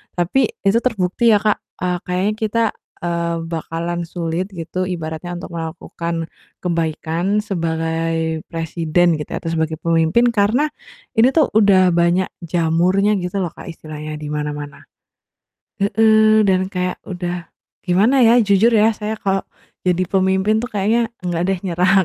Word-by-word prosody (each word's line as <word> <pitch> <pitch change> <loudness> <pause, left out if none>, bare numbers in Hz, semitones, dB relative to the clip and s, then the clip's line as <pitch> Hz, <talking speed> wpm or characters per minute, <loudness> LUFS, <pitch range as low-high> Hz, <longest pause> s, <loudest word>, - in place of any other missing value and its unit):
tapi 195 +9 +2 0.2
itu 200 +3 +3
terbukti 220 +1 +2
ya, 205 - +1
Kak, 210 -1 +2 0.2
eee, 180 0 0
kayaknya 185 +3 0
kita, 225 +1 0 0.4
eee, 170 -1 -1
bakalan 170 +1 -3
sulit 170 +1 -3
gitu, 180 +2 -3
ibaratnya, 170 -1 -5
untuk - - -8
melakukan 165 0 -4 0.3
kebaikan 170 +3 -1
sebagai 165 -3 -2
presiden, 165 0 0
gitu 150 - -6
ya, - - -3
atau 165 - -4
sebagai 160 -1 -2
pemimpin, 165 +8 +3
karena 235 +7 +2 0.5
ini 250 +4 +5
tuh 315 -4 +3
udah 190 -3 +5
banyak 175 +2 +2 0.2
jamurnya, 180 +5 +2
gitu 180 +2 -2
loh, 175 - -1
Kak, - - -12
istilahnya 155 -2 -7
di 150 - -5
mana-mana. 150 -1 -5 1.0
Heeh, 215 +1 +4
dan 185 -1 +2
kayak 180 -2 -3
udah 175 -1 -4 0.3
gimana 215 +9 +3
ya, 235 +1 +6
jujur 210 0 +4
ya, 225 -1 +4
saya 215 +1 -4
kalau 195 -2 0 0.4
jadi 180 0 +1
pemimpin 190 +3 +1
tuh 245 - -5
kayaknya 220 +3 +1 0.2
nggak 175 -1 -1
deh, 190 - +1
nyerah, 180 +1 +2
180 Hz, 140 wpm, -19 LUFS, 165-205 Hz, 1.0 s, ya